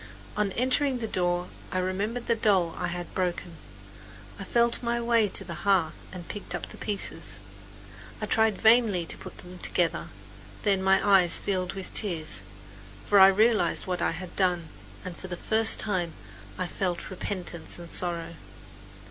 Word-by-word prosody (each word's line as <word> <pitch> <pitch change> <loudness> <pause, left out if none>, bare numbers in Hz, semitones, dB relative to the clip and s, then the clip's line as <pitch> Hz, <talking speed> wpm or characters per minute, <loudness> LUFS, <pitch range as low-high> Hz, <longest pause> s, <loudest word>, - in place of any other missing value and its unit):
On 210 -2 +1
entering 260 +2 +1
the 230 -2 -3
door 175 -2 0 0.2
I - - -1
remembered 200 +6 -1
the 235 - +3
doll 195 -7 +2
I - - -2
had 175 0 -5
broken. 175 -2 -2 0.8
I - - -4
felt 235 +4 +1
my 235 0 0
way 235 -2 +3
to 195 - -1
the 175 -2 -6
hearth 185 -6 +3 0.2
and 180 -2 -8
picked 205 - -5
up - - -4
the - - -11
pieces. 205 -2 -3 0.8
I - - -2
tried 220 -2 +2
vainly 220 -6 +4
to - - -2
put 185 - -10
them 180 0 -11
together. 175 -1 0 0.6
Then 195 -2 +2
my 190 +2 +3
eyes 185 -4 +5
filled 185 -2 -1
with 195 -1 -7
tears; 165 -7 -1 0.6
for 205 - +5
I 190 - +10
realized 210 -2 +3
what 180 -1 -2
I - - +2
had 180 +1 -8
done, 180 -4 +1 0.4
and 180 -2 -5
for 190 - -8
the 180 -1 -4
first 220 +3 +3
time 180 -6 -1 0.4
I 185 - -1
felt 180 0 -3
repentance 180 -3 -5
and 170 -1 -10
sorrow. 170 -2 -1
190 Hz, 165 wpm, -27 LUFS, 175-215 Hz, 0.8 s, I